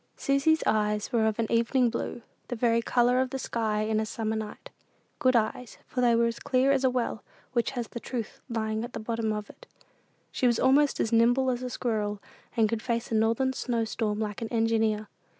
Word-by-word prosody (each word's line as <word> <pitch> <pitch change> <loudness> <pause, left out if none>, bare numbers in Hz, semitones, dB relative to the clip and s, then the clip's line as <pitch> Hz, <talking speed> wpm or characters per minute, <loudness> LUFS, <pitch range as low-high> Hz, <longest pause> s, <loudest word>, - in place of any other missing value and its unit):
Susy's 275 +4 +2
eyes 210 -1 +1
were 225 -2 +3
of 220 - -1
an 230 - +1
"evening 235 +1 +2
blue," 235 - -4 0.2
the 245 - -3
very 230 0 +2
color 245 +2 +3
of 260 - -1
the 270 - -3
sky 220 -4 -1
in 215 0 0
a 220 - 0
summer 220 0 -2
night; 215 -1 -6 0.5
good 255 -1 +3
eyes, 225 +1 -1
for 250 - -3
they 240 -1 +4
were 235 0 +3
as 230 0 -2
clear 270 -1 +2
as 275 -1 +2
a 260 - +5
well 245 -3 -2 0.3
which 235 -2 +1
has 235 -2 -2
the 235 - -6
"truth" 235 -2 -5
lying 220 -1 -2
at 240 - -7
the - - -4
bottom 225 0 -2
of 210 -1 -3
it. - - -16 0.6
She 255 - +1
was 235 -2 +2
almost 280 +2 +4
as 225 - 0
nimble 245 +3 +4
as 245 0 -3
a 250 - -3
squirrel, 210 -4 -2 0.4
and 225 -1 +4
could 220 0 -2
face 235 -1 -2
a - - -1
northern 230 +4 +2
snow 235 -3 -1
storm 215 -1 -2
like 210 -1 -3
an 230 - -2
engineer. 225 -2 +1
230 Hz, 215 wpm, -28 LUFS, 220-250 Hz, 0.6 s, a